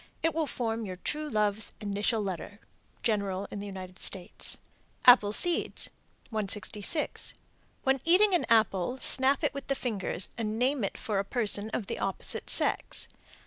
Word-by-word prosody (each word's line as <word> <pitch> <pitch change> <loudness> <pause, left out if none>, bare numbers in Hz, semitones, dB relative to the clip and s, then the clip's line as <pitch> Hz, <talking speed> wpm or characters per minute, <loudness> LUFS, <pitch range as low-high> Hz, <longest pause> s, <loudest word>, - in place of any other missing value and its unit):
It 325 -1 +2
will 320 -2 0
form 230 -3 -2
your 185 -3 -5
true 300 +11 -3
love's 210 -2 0
initial 210 +1 0
letter. 195 +2 -5 0.4
General 200 -3 0
in 205 - -5
the 205 - -6
United 185 -2 -8
States. 185 -2 -3 0.5
APPLE 245 -5 +8
SEEDS. 345 +10 0 0.4
166. 210 - 0 0.5
When 265 -1 +2
eating 375 +4 +5
an 355 - +2
apple, 220 +1 +3
snap 265 +3 +3
it 295 - +1
with 280 -1 -7
the 275 - +1
fingers 205 -7 -2
and 215 -1 -2
name 255 +1 +1
it 195 - -2
for 215 -5 -1
a - - +1
person 210 -1 +1
of 220 -1 -3
the - - -4
opposite 195 - -2
sex. - - +1
215 Hz, 155 wpm, -29 LUFS, 200-265 Hz, 0.5 s, APPLE